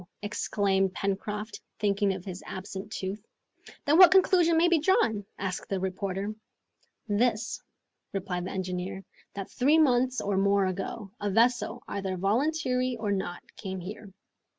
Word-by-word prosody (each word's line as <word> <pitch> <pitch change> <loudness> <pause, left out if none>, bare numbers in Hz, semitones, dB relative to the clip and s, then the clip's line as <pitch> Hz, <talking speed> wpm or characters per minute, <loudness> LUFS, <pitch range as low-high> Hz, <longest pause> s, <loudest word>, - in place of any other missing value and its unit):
exclaimed 195 -2 +1
Pencroft, 205 +2 -3 0.2
thinking 200 -1 +1
of 185 -1 -5
his 185 -1 -6
absent 190 +1 -6
tooth. 195 +1 -4 0.6
"Then 300 +4 +4
what 365 -2 +11
conclusion 360 -3 +5
may 340 +2 +5
be 345 -2 +4
drawn?" 225 - +2
asked 185 -2 -4
the 195 - -1
reporter. 190 +2 -3 0.7
"This," 215 +1 0 0.5
replied 180 -2 -3
the - - -4
engineer, 185 0 -4 0.3
"that 195 -1 -6
three 285 +5 +3
months 255 -4 +3
or 200 -1 -1
more 200 0 +3
ago, 195 +2 -4
a 205 -1 -1
vessel, 240 +2 +2
either 195 -2 -3
voluntarily 255 - +1
or 215 -2 -2
not, 190 -3 -3
came 190 -2 -5
here." 195 +2 -8
200 Hz, 140 wpm, -28 LUFS, 190-245 Hz, 0.7 s, what